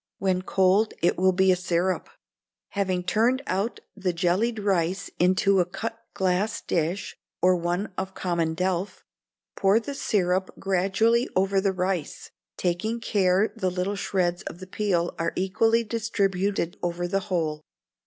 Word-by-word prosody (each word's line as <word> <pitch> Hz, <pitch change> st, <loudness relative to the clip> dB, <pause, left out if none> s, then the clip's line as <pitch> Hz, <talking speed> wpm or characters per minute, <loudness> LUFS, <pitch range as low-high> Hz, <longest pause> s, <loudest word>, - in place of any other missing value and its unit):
(When 185 Hz, -2 st, 0 dB
cold 190 Hz, +3 st, +2 dB
it 175 Hz, -, +4 dB
will 185 Hz, +1 st, +3 dB
be 190 Hz, +1 st, +4 dB
a -, -, +4 dB
syrup.) 180 Hz, +1 st, -1 dB, 0.6 s
Having 185 Hz, -3 st, -1 dB
turned 235 Hz, +9 st, +2 dB
out 195 Hz, +5 st, -2 dB
the 190 Hz, -3 st, -1 dB
jellied 185 Hz, +7 st, +1 dB
rice 195 Hz, -2 st, 0 dB
into 185 Hz, +2 st, +3 dB
a 180 Hz, -, +3 dB
cutglass 205 Hz, -1 st, -2 dB
dish, 170 Hz, +4 st, -2 dB, 0.2 s
or 185 Hz, +1 st, +4 dB
one 175 Hz, +4 st, -2 dB
of 190 Hz, 0 st, -5 dB
common 170 Hz, -3 st, -1 dB
delf, 185 Hz, +2 st, -2 dB, 0.5 s
pour 195 Hz, +3 st, +4 dB
the 280 Hz, +5 st, -6 dB
syrup 190 Hz, -7 st, 0 dB
gradually 195 Hz, +6 st, +2 dB
over 195 Hz, +1 st, +2 dB
the 195 Hz, 0 st, +2 dB
rice, 185 Hz, -3 st, -3 dB, 0.3 s
taking 190 Hz, +6 st, -1 dB
care 195 Hz, -2 st, +2 dB
the 190 Hz, -5 st, 0 dB
little 180 Hz, +3 st, -2 dB
shreds 180 Hz, -3 st, 0 dB
of -, -, -6 dB
the 185 Hz, -, -9 dB
peel 185 Hz, -3 st, 0 dB
are 165 Hz, 0 st, -1 dB
equally 225 Hz, +5 st, +2 dB
distributed 200 Hz, -5 st, -1 dB
over 175 Hz, 0 st, -2 dB
the 195 Hz, +2 st, 0 dB
whole. 155 Hz, -4 st, -1 dB
190 Hz, 145 wpm, -26 LUFS, 180-205 Hz, 0.6 s, it